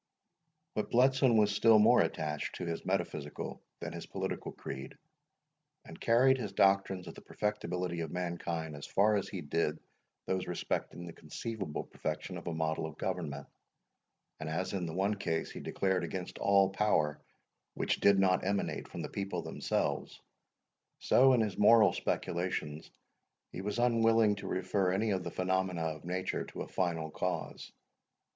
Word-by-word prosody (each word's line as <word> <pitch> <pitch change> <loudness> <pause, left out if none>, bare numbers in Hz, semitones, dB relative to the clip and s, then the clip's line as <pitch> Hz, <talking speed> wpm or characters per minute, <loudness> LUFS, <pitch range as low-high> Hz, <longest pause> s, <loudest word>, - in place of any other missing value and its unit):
But 105 - -2
Bletson 130 -1 +4
was 105 -1 +4
still 110 +1 +6
more 110 +3 +6
attached 75 -2 -2
to 90 - -4
his 85 -1 -3
metaphysical 75 -1 -3 0.2
than - - -5
his - - -7
political - - -4
creed, 65 0 -7 0.9
and - - -12
carried 130 +3 +4
his 100 -5 -4
doctrines 95 -1 +3
of 85 - -7
the - - -12
perfectibility 90 -4 -2
of 80 -2 -3
mankind 85 -3 -3
as 70 - -8
far 105 +2 +3
as 100 - -1
he 95 - -5
did 75 0 0 0.5
those 95 -1 -1
respecting 85 0 -3
the 85 - -8
conceivable 95 +1 -5
perfection 80 +4 -5
of - - -12
a - - -1
model 80 0 -1
of 80 -1 -11
government; 70 -1 -3 0.9
and 80 0 -4
as 90 +4 -2
in 90 -3 -2
the 80 - -5
one 100 +3 +1
case 80 -4 -2
he - - -7
declared 95 -2 0
against 90 +1 -5
all 100 -1 +4
power 95 -7 +1 0.5
which - - 0
did 100 -1 +5
not 95 -1 +3
emanate 100 +1 -1
from - - -6
the - - -3
people 100 0 -3
themselves, - - -2 0.8
so, 130 +1 +5
in 120 - +4
his 105 -4 -2
moral 105 +1 +7
speculations, 85 -4 -2 0.6
he - - -6
was 105 +3 -3
unwilling 115 -2 +4
to 100 - -7
refer 95 0 0
any 105 +3 +1
of 95 -2 0
the - - -4
phenomena 90 -2 0
of 80 -1 -4
nature 90 +1 -2
to - - -6
a - - -9
final 80 -4 -1
cause. 90 -1 -3
95 Hz, 160 wpm, -32 LUFS, 80-105 Hz, 0.9 s, moral